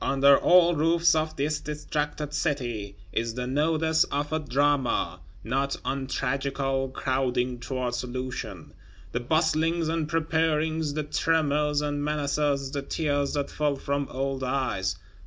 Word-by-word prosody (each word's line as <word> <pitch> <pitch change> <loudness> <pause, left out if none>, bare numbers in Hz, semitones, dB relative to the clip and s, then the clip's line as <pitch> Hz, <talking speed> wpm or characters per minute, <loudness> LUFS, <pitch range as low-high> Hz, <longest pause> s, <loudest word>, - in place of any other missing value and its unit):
Under 140 +1 +5
all 175 -1 +5
roofs 165 +2 +4
of 155 0 0
this 150 +2 0
distracted 150 0 -3
City 120 -10 -2 0.2
is 115 0 -1
the 125 0 -2
nodus 160 +4 +2
of 145 +2 -1
a 155 - +1
Drama, 145 -1 +1 0.2
not 135 +5 -1
untragical, 135 0 -1
crowding 130 -2 -1
toward 125 -1 -3
solution. 125 -7 -5 0.4
The 120 - -1
bustlings 160 +4 +1
and 160 -2 -1
preparings, 160 -1 0
the 155 - -1
tremors 150 -1 +1
and 145 -1 -2
menaces; 145 -2 0
the 140 -1 -2
tears 145 -1 -1
that 145 -1 -2
fell 150 -2 0
from 140 0 -2
old 135 0 -2
eyes! 110 -9 -1
145 Hz, 130 wpm, -27 LUFS, 130-155 Hz, 0.4 s, Under